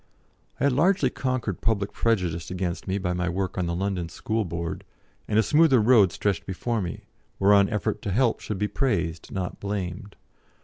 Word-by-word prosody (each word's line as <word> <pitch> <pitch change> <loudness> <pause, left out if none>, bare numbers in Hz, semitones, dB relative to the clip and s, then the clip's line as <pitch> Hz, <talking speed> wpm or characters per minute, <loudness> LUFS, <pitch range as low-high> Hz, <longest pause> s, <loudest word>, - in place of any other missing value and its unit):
I - - -2
had 140 -2 +3
largely 165 -1 +3
conquered 130 -7 -2
public 105 -3 0
prejudice 90 -8 0
against 90 0 -3
me 95 +1 0
by 90 -2 -1
my 90 0 -1
work 95 +2 -2
on 90 -2 -1
the 85 - -1
London 90 -2 -2
School 110 +5 -2
Board, 85 -1 -4 0.4
and 105 - +1
a 110 - +5
smoother 150 +2 +5
road 110 -5 +5
stretched 100 -4 -1
before 110 +4 -2
me, 85 -3 -5 0.4
whereon 100 0 +5
effort 105 -1 -2
to 100 - -3
help 115 +3 +2
should 105 - -4
be 105 +2 0
praised 95 - -1
not 95 -2 -4
blamed. 100 0 -4
100 Hz, 180 wpm, -25 LUFS, 90-115 Hz, 0.4 s, a